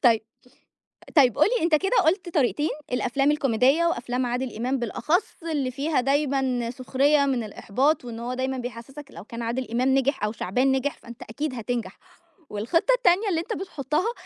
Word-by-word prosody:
طيب 230 -3 +6 1.0
طيب 260 -5 +5
قُل 305 - +6
لي 465 - 0
أنت 335 -2 +3
كده 390 +10 +2
قُلت 345 +2 +1
طريقتين 295 +2 +1 0.2
الأفلام 270 +3 +1
الكوميدية 275 +2 +3
وأفلام 250 -6 -1
عادل 245 0 -3
إمام 255 +4 -1
بالأخص 305 - -1
اللي 295 -6 -1
فيها 280 +2 0
دايمًا 265 -3 0
سخرية 275 +3 +2
من 260 -4 0
الإحباط، 255 +8 0
وإن 235 -2 -7
هو 245 +2 -3
دايمًا 260 0 -2
بيحسّسك 245 +4 -7
لو 170 +4 -11
كان 230 +1 -7
عادل 235 +1 -3
إمام 255 +3 +2
نجح 270 -4 +1
أو 210 - -1
شعبان 250 +6 0
نجح 265 +2 -1
فأنت 235 0 -12
أكيد 285 +5 -4
هتنجح، 240 0 -4 0.5
والخطة 330 - +1
التانية 400 -2 +3
اللي 335 -4 +1
أنت 340 - -5
بتحطها 320 - -2
265 Hz, 170 wpm, -25 LUFS, 240-300 Hz, 1.0 s, طيب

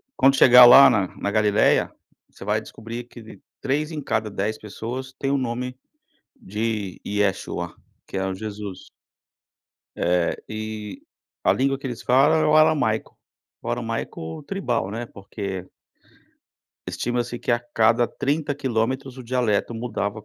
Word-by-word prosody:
quando 135 +1 +4
chegar 125 -2 +9
lá, 135 +3 +10
na 105 -7 +1
na 100 - -2
Galileia, 105 0 +3 0.4
você - - -13
vai 105 +1 +1
descobrir 115 +2 -8
que 120 -1 -13
de 110 -3 -13 0.2
3 150 +4 -1
em 155 -2 -4
cada 110 -5 -1
10 105 +2 -2
pessoas 125 +5 -6
tem 135 - -1
o 140 - +2
nome 125 0 -3 0.6
de 105 -1 -3
Yeshua, 100 -1 -1 0.3
que - - -7
é 95 0 -1
o 95 - -2
Jesus. 105 -2 -7 1.1
É, 90 0 +1
e 110 -1 -6 0.4
a - - +4
língua 135 +1 +1
que 140 - -6
eles 120 -2 -6
falam 135 +6 +4
é - - +2
o 150 - +3
aramaico, 150 -8 +2 0.5
o - - -6
aramaico 80 - -4
tribal, 125 - -2
né, 115 +3 -4
porque 100 -3 -7 1.2
estima-se 120 0 -2
que, 120 - -3
a 120 - +3 0.2
cada 115 +2 +4
30 145 +5 -1
quilômetros, 130 0 -2
o - - -7
dialeto 120 -2 0
mudava, 110 -2 -3
115 Hz, 145 wpm, -23 LUFS, 105-130 Hz, 1.2 s, lá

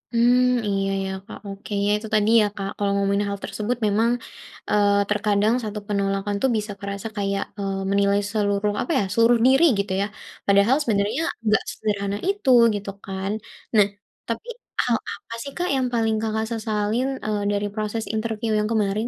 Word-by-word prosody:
Mmm, 245 +1 +4
iya 195 -1 0
ya, 190 - -3
Kak. - - -9
Oke, 195 +1 -9
ya 205 - +2
itu 215 +1 -7
tadi 210 0 +3
ya, - - +3
Kak, 195 -1 -4
kalau 200 -1 0
ngomongin 200 +1 +1
hal 200 0 -4
tersebut 225 +3 -2
memang, 225 +3 +2 0.6
eee, 205 -1 +3
terkadang 210 +1 +2
1 210 -1 -4
penolakan 200 0 -1
itu 265 - +2
bisa 210 0 -3
kerasa 200 +1 -5
kayak, 200 0 0 0.2
eee, 195 -1 -2
menilai 200 0 +3
seluruh 205 -1 +1
apa - - -3
ya, - - +1
seluruh 230 +2 +5
diri 270 +4 +5 0.2
gitu 200 -1 -1
ya. 200 - +2 0.4
Padahal 200 +5 +5
sebenarnya 210 +5 0 0.2
enggak 215 0 +3
sesederhana 205 -2 -2
itu, 400 -9 -1 0.3
gitu 200 0 -5
kan. 195 +1 -3 0.4
Nah, 210 -2 +7 0.4
tapi 230 - -4 0.4
hal - - +2 0.2
apa 230 - -10
sih, 280 - -7
Kak, 355 0 -1
yang 260 -1 +1
paling 225 -1 +2
Kakak 220 0 -1
sesalin, 220 +2 0 0.2
eee, 210 -1 -1
dari 205 0 0
proses 215 +1 -2
interview 220 0 -2
yang 210 - 0
kemarin? 215 +1 +1
210 Hz, 175 wpm, -23 LUFS, 200-225 Hz, 0.6 s, Nah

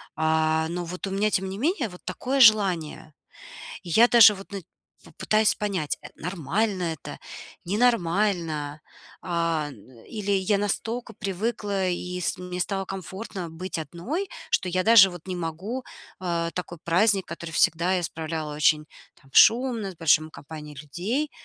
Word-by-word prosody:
А, 160 0 +1
но 175 +1 -3
вот 180 +3 -5
у - - -5
меня, 205 +2 +1
тем 190 0 0
не 190 - -6
менее, 280 - 0
вот 180 -1 -13
такое 270 +2 -2
желание. 185 -9 +4 0.7
И 175 - -9
я 225 +8 +6
даже 230 -3 +8
вот, 195 +1 -12
ну, 200 -1 -5 0.4
в - - -15
пытаюсь 215 0 +3
понять, 190 -8 -2
э, - - -9
нормально 185 +4 -2
это, 155 - -9 0.5
ненормально. 175 -8 0 0.4
А, 165 -3 -1
ну, 125 -4 -16
или 205 -3 -4
я 195 +1 +2
настолько 225 +4 -2
привыкла, 200 -1 -2
и 180 0 -3
с - - -1
мне 180 0 -6
стало 195 +1 -1
комфортно 190 -1 -6
быть 175 +3 -6
одной, 210 - -4 0.2
что 185 - +1
я 185 +1 0
даже 220 -3 +8
вот 175 -1 -11
не 185 - -3
могу, 180 +9 -4 0.4
а, 170 -2 -2
такой 175 -1 -6
праздник, 195 +3 +3
который 170 0 -7
всегда 170 +3 +2
я 180 - -1
справляла 160 -2 -4
очень 150 0 +3 0.3
там 135 - -23
шумно, 230 -4 +5
с - - -15
большим 155 -1 +3
компанией 150 -1 -10
людей. 220 - -3
180 Hz, 155 wpm, -25 LUFS, 165-210 Hz, 0.7 s, даже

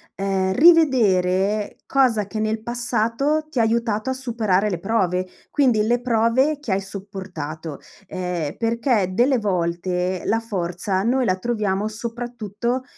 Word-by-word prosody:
ehm, 190 -1 0
rivedere 210 - +3
cosa 240 -7 +2
che 215 +2 -5
nel 215 0 -1
passato 245 +5 0
ti 270 - -2
ha - - +4
aiutato 225 +1 0
a - - +1
superare 225 -6 0
le 180 -4 -3
prove; 185 -2 0 0.2
quindi 255 -7 +3
le 240 +2 +2
prove 245 +5 +2
che 290 -8 -5
hai 190 +1 +1
sopportato, 190 -6 -7 0.3
ehm, 180 -5 -3
perché 230 -3 +1
delle 250 +6 +3
volte 180 -2 -1
la 225 - +2
forza 190 -3 -2
noi 250 +3 +2
la 185 - +2
troviamo 210 -2 -1
soprattutto 235 +1 -4
215 Hz, 135 wpm, -22 LUFS, 190-240 Hz, 0.3 s, ha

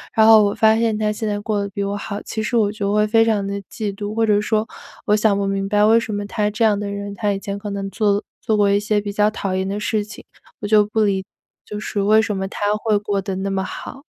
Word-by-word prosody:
然 220 -1 +5
后 220 -1 +8
我 200 - +1
发 220 -1 +4
现 225 -2 +1
他 210 -1 0
现 215 +1 -4
在 205 0 -2
过 205 -1 -1
得 200 - -3
比 200 +1 -4
我 200 +1 -2
好， 205 0 -5
其 220 - -4
实 235 +2 -1
我 205 -2 +2
就 205 -1 -2
会 210 0 +3
非 225 +1 +4
常 210 -3 +1
地 200 0 -3 0.2
嫉 210 -3 -3
妒， 205 +1 -5
或 225 0 +2
者 205 -1 +3
说 215 +1 0 0.4
我 210 - +3
想 210 -1 +2
不 200 - -1
明 195 0 -1
白 210 +1 +2
为 225 +2 +5
什 220 -2 -5
么 205 0 -3
他 210 0 -1
这 220 +2 -1
样 210 -2 +3
的 205 -1 -4
人 200 0 -5
他 205 0 0
以 195 - -4
前 200 -1 -5
可 205 0 -6
能 195 0 -4
做 210 -1 +1
了 205 - 0 0.2
做 220 - 0
过 205 -1 +3
一 200 0 +3
些 210 0 0
比 205 0 -5
较 210 +1 +2
讨 195 -3 -3
厌 190 0 -1
的 200 +1 -3
事 210 0 -1
情， 220 - -11 0.4
我 205 - -4
就 210 -1 +5
不 215 +1 -1
理 195 -2 +1
解 - - -59 0.4
就 210 0 -6
是 205 -1 -3
为 215 +2 +5
什 210 -3 -2
么 190 0 -2
他 205 +1 -3
会 215 -1 +1
过 205 -1 -2
得 190 0 -4
那 195 +1 -2
么 190 0 -1
好？ 270 +7 -8
210 Hz, 315 characters per minute, -20 LUFS, 200-215 Hz, 0.4 s, 后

